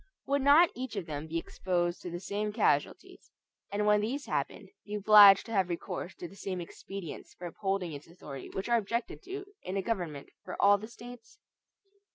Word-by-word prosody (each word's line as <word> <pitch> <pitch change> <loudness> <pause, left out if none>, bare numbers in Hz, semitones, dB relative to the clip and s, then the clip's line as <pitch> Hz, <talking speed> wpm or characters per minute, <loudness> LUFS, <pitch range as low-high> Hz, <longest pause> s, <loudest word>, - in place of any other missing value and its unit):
Would 280 0 +1
not 290 +5 +6
each 255 -3 -6
of 195 -4 -3
them 150 0 -5
be 165 +1 -2
exposed 175 0 -2
to 180 - -6
the 175 0 -5
same 205 +3 -3
casualties; 220 - -1 0.4
and 205 +1 0
when 210 0 +4
these 265 +7 -3
happened, - - -3
be 210 - -6
obliged 205 -1 +8
to 230 - -9
have 190 -4 +1
recourse 175 +1 -5
to 175 - -7
the 195 - -15
same 190 -2 -4
expedients 175 0 -8
for 180 - -9
upholding 185 0 -2
its 145 +1 -9
authority 150 -5 -9
which 190 - -4
are 240 0 +4
objected 235 - -3
to 390 +1 -6 0.2
in 190 +2 -4
a 195 - -1
government 175 -10 -3
for - - -7
all 205 0 +6
the 215 - -8
States? 240 0 -12
200 Hz, 195 wpm, -30 LUFS, 175-230 Hz, 0.4 s, obliged